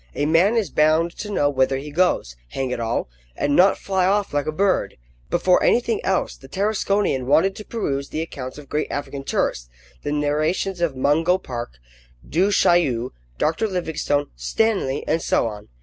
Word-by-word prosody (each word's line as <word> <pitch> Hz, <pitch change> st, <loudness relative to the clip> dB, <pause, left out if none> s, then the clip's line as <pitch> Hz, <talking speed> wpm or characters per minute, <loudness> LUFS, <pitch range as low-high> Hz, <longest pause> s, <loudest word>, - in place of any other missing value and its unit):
A 145 Hz, -, 0 dB
man 175 Hz, +9 st, +3 dB
is 200 Hz, -10 st, 0 dB
bound 155 Hz, +3 st, +2 dB
to 210 Hz, -, -5 dB
know 170 Hz, -8 st, +1 dB
whither 135 Hz, -1 st, +1 dB
he 145 Hz, +2 st, -7 dB
goes, 155 Hz, -, +1 dB
hang 130 Hz, -, -3 dB
it 125 Hz, -, -2 dB
all! 115 Hz, -, -1 dB, 0.3 s
and 145 Hz, 0 st, 0 dB
not 190 Hz, +2 st, +5 dB
fly 190 Hz, -2 st, 0 dB
off 200 Hz, -2 st, +1 dB
like 145 Hz, 0 st, 0 dB
a -, -, 0 dB
bird. 190 Hz, +4 st, 0 dB, 0.3 s
Before 180 Hz, +1 st, +3 dB
anything 235 Hz, -2 st, +2 dB
else, 190 Hz, -, 0 dB
the 135 Hz, -, -15 dB
Tarasconian 195 Hz, -7 st, 0 dB
wanted 190 Hz, +7 st, +3 dB
to 210 Hz, -, -7 dB
peruse 140 Hz, -12 st, -3 dB
the 155 Hz, -, -2 dB
accounts 130 Hz, -5 st, -7 dB
of 150 Hz, -2 st, -11 dB
great 150 Hz, +3 st, -1 dB
African 140 Hz, -1 st, -5 dB
tourists, -, -, -1 dB, 0.3 s
the 145 Hz, -, -3 dB
narrations 155 Hz, +5 st, 0 dB
of 165 Hz, -6 st, 0 dB
Mungo 160 Hz, +7 st, +2 dB
Park, 120 Hz, -, -6 dB, 0.5 s
Du 185 Hz, +5 st, +2 dB
Chaillu, 145 Hz, -, +2 dB, 0.3 s
Dr. 165 Hz, +8 st, 0 dB
Livingstone, 160 Hz, -6 st, -1 dB
Stanley, 135 Hz, -, 0 dB
and 160 Hz, +2 st, +1 dB
so -, -, +1 dB
on. 105 Hz, -2 st, -6 dB
155 Hz, 175 wpm, -22 LUFS, 135-190 Hz, 0.5 s, not